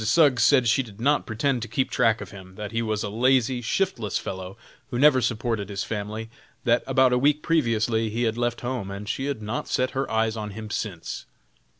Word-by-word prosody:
Suggs 130 0 +4
said 130 -1 +5
she 115 +4 +4
did 110 -5 -11
not 145 +5 +2
pretend 120 +3 0
to 115 - -4
keep 130 +4 -1
track 115 0 +2
of - - -8
him; 95 -2 -12
that 105 +1 -6
he 115 0 0
was 110 -2 -1
a 105 - -3
lazy, 125 +2 +2
shiftless 120 - -1
fellow, 95 +1 -6 0.3
who 120 - -3
never 135 -1 +5
supported 115 -3 -1
his 100 -1 -3
family; 110 +1 -4 0.4
that - - +3
about 130 -1 +4
a 125 - +3
week 150 +3 +2
previously 115 -8 +1
he 115 +3 -1
had 115 -1 +1
left 120 0 -1
home, 120 -5 -3
and 100 +1 -7
she 135 +3 -2
had 140 -6 -3
not 105 +3 -3
set 130 0 0
her 135 +1 -2
eyes 110 0 +1
on 105 -1 -4
him 110 -1 -7
since. 95 -8 -4
115 Hz, 215 wpm, -25 LUFS, 105-130 Hz, 0.4 s, said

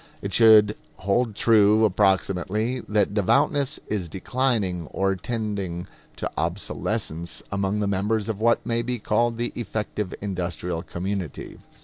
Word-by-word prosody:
It 100 -1 -4
should 110 -1 +7 0.2
hold 105 +3 0
true, 110 0 +5
approximately, 95 +4 +1
that 105 -1 +2
devoutness 140 - +2
is 95 -6 -3
declining 95 - 0
or 95 +3 0
tending 100 -5 -3 0.3
to - - -3
obsolescence 85 -1 -3
among 100 +1 -1
the 100 - 0
members 100 +2 0
of 110 -2 -3
what 115 +1 +3
may 115 0 0
be 125 +1 -2
called 115 +2 +1
the 120 +1 -2
effective 105 -3 -3
industrial 90 -3 -3
community. 95 -2 -5
100 Hz, 125 wpm, -24 LUFS, 95-115 Hz, 0.3 s, should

